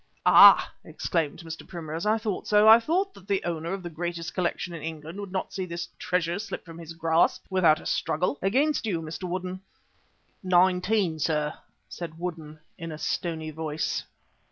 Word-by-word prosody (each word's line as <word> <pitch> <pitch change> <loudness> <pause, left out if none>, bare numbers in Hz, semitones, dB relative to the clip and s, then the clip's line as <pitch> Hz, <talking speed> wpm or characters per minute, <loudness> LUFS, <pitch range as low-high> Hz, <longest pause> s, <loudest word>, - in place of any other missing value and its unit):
"Ah!" - - +8
exclaimed 165 -3 -2
Mr. 160 -1 -8
Primrose, 165 0 -5
"I 215 +1 +3
thought 215 -4 -4
so. 210 0 +5
I 225 +1 +10
thought 370 +10 0
that 190 - -16
the 200 -2 0
owner 170 0 -3
of 195 -1 -4
the 175 - -5
greatest 170 +1 -4
collection 180 -1 -2
in 165 - -7
England 160 +3 -7
would 200 -2 -7
not 190 -1 -3
see 190 - -3
this 170 0 -5
treasure 180 0 -1
slip 220 - -6
from 165 -1 -11
his 165 -1 -9
grasp 165 0 +1
without 170 -5 +4
a - - -13
struggle. 160 -3 -1
Against 260 +7 +1
you, 180 -6 0
Mr. 165 +3 -6
Woodden." 185 +1 -4 0.8
"Nineteen, 185 -1 +2
sir," 150 -1 0 0.3
said 165 -2 -7
Woodden 165 -3 -6 0.2
in 165 -1 -6
a 155 - -6
stony 160 -1 -3
voice. 155 0 -3
175 Hz, 175 wpm, -26 LUFS, 160-190 Hz, 0.8 s, I